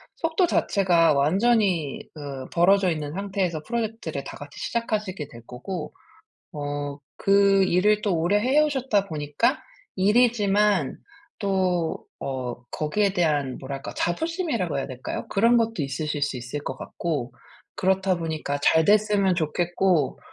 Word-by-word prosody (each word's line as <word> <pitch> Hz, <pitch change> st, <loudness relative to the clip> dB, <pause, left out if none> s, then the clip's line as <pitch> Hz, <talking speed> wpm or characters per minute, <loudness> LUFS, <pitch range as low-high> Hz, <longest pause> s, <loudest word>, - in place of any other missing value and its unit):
속도 330 Hz, +2 st, +1 dB
자체가 175 Hz, -, +3 dB
완전히 180 Hz, -, +2 dB
그 140 Hz, -4 st, -7 dB
벌어져 190 Hz, +2 st, +4 dB
있는 150 Hz, -2 st, -4 dB
상태에서 190 Hz, -4 st, -2 dB
프로젝트를 220 Hz, -, -3 dB
다 -, -, -8 dB
같이 145 Hz, 0 st, -11 dB
시작하시게 210 Hz, -, -2 dB
될 115 Hz, -, -12 dB
거고 150 Hz, +6 st, -6 dB, 0.6 s
어 145 Hz, -1 st, -4 dB, 0.2 s
그 195 Hz, 0 st, +5 dB
일을 205 Hz, +4 st, +3 dB
또 195 Hz, -5 st, +1 dB
오래 180 Hz, +6 st, +2 dB
해 260 Hz, +7 st, +3 dB
오셨다 265 Hz, -9 st, +1 dB
보니까 155 Hz, -, 0 dB, 0.4 s
일이지만 205 Hz, -, +3 dB, 0.4 s
또 185 Hz, -5 st, 0 dB, 0.2 s
어 130 Hz, -3 st, -3 dB, 0.2 s
거기에 195 Hz, +6 st, 0 dB
대한 150 Hz, -7 st, +1 dB
뭐랄까 135 Hz, 0 st, -6 dB
자부심이라고 235 Hz, -, -1 dB
해야 135 Hz, -, -2 dB
될까요? 130 Hz, -1 st, -6 dB
그런 230 Hz, +4 st, +4 dB
것도 230 Hz, -1 st, +1 dB
있으실 145 Hz, +2 st, -3 dB
수 145 Hz, -2 st, 0 dB
있을 125 Hz, +4 st, -5 dB
것 130 Hz, -, -4 dB
같고. 145 Hz, -7 st, -4 dB, 0.4 s
그렇다 190 Hz, 0 st, +1 dB
보니까 155 Hz, -3 st, -3 dB
잘 160 Hz, +2 st, +4 dB
됐으면 205 Hz, -2 st, +3 dB
좋겠고. 175 Hz, -1 st, 0 dB
180 Hz, 290 characters per minute, -25 LUFS, 150-210 Hz, 0.6 s, 그